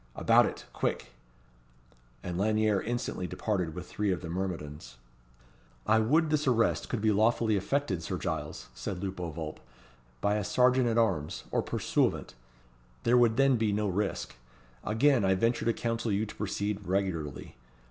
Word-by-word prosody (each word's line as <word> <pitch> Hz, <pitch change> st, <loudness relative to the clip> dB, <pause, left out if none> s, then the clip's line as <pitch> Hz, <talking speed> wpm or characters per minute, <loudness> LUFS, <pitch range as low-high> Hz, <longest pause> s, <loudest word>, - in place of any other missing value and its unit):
About -, -, +5 dB
it, -, -, -7 dB
quick!" -, -, -2 dB, 1.1 s
And 90 Hz, -2 st, -4 dB
Lanyere 105 Hz, +1 st, +2 dB
instantly 120 Hz, -6 st, -3 dB
departed 90 Hz, -3 st, -2 dB
with -, -, -7 dB
three 105 Hz, -1 st, -1 dB
of 90 Hz, -, -2 dB
the 85 Hz, -, -6 dB
myrmidons. 75 Hz, -9 st, -5 dB, 0.9 s
"I 110 Hz, +1 st, +4 dB
would 150 Hz, +8 st, +2 dB
this 150 Hz, -2 st, +1 dB
arrest 115 Hz, -3 st, +2 dB
could 120 Hz, -, -2 dB
be 110 Hz, 0 st, +3 dB
lawfully 110 Hz, +1 st, +2 dB
effected, 100 Hz, -2 st, -1 dB
Sir -, -, -3 dB
Giles," -, -, -4 dB
said 95 Hz, -2 st, -5 dB
Lupo 95 Hz, -3 st, -3 dB
Vulp, 80 Hz, -1 st, -6 dB, 0.6 s
"by 100 Hz, +9 st, +1 dB
a 105 Hz, -, -1 dB
serjeant 125 Hz, +3 st, +3 dB
at 115 Hz, -1 st, +1 dB
arms 95 Hz, -10 st, 0 dB
or -, -, +2 dB
pursuivant. -, -, 0 dB, 0.7 s
There 120 Hz, -, +4 dB
would 120 Hz, -2 st, +4 dB
then 135 Hz, -2 st, +4 dB
be 110 Hz, -2 st, +1 dB
no 105 Hz, +1 st, 0 dB
risk. 100 Hz, +1 st, -2 dB, 0.5 s
Again 125 Hz, +3 st, +3 dB
I 95 Hz, 0 st, +3 dB
venture 115 Hz, +5 st, +1 dB
to 115 Hz, -, +4 dB
counsel 115 Hz, -1 st, -2 dB
you 100 Hz, +2 st, +1 dB
to 105 Hz, -, -10 dB
proceed 100 Hz, -1 st, -3 dB
regularly. 90 Hz, -7 st, -2 dB
105 Hz, 155 wpm, -30 LUFS, 95-115 Hz, 1.1 s, About